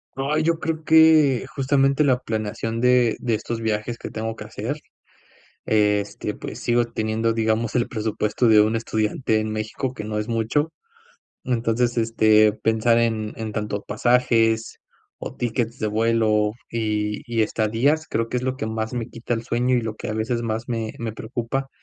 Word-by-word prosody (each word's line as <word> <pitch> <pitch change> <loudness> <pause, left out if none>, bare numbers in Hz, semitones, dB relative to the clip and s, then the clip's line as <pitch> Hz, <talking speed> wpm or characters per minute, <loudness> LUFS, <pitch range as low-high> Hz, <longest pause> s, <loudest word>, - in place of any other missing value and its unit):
Ay, 140 +3 0
yo 165 0 +1
creo 160 -1 -3
que, 155 -5 +5
justamente, 135 +1 +2
la 130 -4 +3
planeación 115 -1 -3
de 125 -2 +4
de 115 -3 0
estos 115 +2 -4
viajes 110 +1 -2
que - - -7
tengo 110 0 -4
que - - -9
hacer, - - -4 0.9
este, 105 -1 0
pues, - - -8
sigo 120 0 +2
teniendo, 115 0 -1
digamos, 110 0 0
el 120 -1 +1
presupuesto 110 +1 -1
de 110 -1 +7
un 110 +2 +2
estudiante 110 0 0
en 110 0 -3
México, 110 +4 -3
que 105 - -6
no 105 0 -3
es 105 +2 -3
mucho. 120 +7 0 0.8
Entonces, 120 0 0
este, 110 -2 +4
pensar 115 +2 +2
en 110 -2 0
en 110 -1 -5
tanto 105 -1 -3
pasajes 115 0 +1 0.4
o - - -6
tickets 120 0 -2
de 110 - 0
vuelo, 110 -1 +2 0.2
y 105 -2 -1
y 115 -2 +1
estadías, 115 +9 +1
creo 115 0 -1
que 125 - -2
es 125 - -3
lo 130 0 -2
que 110 - -3
más 110 +1 -3
me 120 -2 -3
quita 115 +1 -4
el 115 0 -3
sueño 125 +2 +1
y - - 0
lo 110 -1 -4
que 120 - -6
a - - -2
veces, 115 +2 -1
más 115 0 -3
me 115 -3 -3
me 115 -2 -4
preocupa. 120 +4 -4
115 Hz, 175 wpm, -23 LUFS, 110-125 Hz, 0.9 s, de